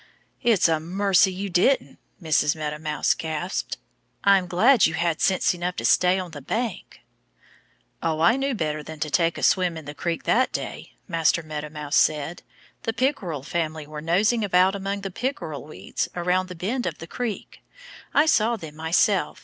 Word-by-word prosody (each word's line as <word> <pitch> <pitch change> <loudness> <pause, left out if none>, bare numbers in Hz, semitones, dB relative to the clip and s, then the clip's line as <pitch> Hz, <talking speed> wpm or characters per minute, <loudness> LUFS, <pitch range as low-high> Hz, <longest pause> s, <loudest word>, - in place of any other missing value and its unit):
"It's 225 -8 +4
a 160 -1 +1
mercy 190 +3 +2
you 190 +2 -4
didn't,". 185 +11 +2 0.2
Mrs. 155 -3 +2
Meadow 150 -1 -4
Mouse 150 -1 +1
gasped. 160 +3 -4 0.5
"I'm 195 -2 +4
glad 220 +8 +5
you 160 - -3
had 170 -1 0
sense 190 -1 +2
enough 180 0 -3
to - - -4
stay 180 +1 +4
on 180 -2 -5
the 145 -2 -9
bank." 220 - -4 1.0
"Oh, 160 -1 -1
I 170 +8 +5
knew 270 -1 -1
better 155 -5 -2
than 155 +1 -9
to 150 - -2
take 170 0 +2
a - - -6
swim 180 -3 +2
in 160 - -9
the 145 - -7
creek 165 +3 -3
that 255 +3 +2
day," - - -6
Master 165 -2 +1
Meadow 150 -1 -6
Mouse 150 -1 -2
said. 155 +2 +1 0.4
"The 225 - -2
Pickerel 195 - -1
family 160 -1 -3
were 150 0 -8
nosing 210 +8 +2
about 185 -1 +4
among 200 0 -3
the 195 -1 -5
pickerel 180 - -4
weeds 155 - -4
around 180 +1 0
the 180 - -7
bend 225 +9 -2
of - - -4
the 165 - -8
creek. 230 +4 -5 0.5
I 295 - +4
saw 235 -6 +3
them 160 -8 -9
myself. 165 +2 +1
175 Hz, 180 wpm, -24 LUFS, 155-200 Hz, 1.0 s, glad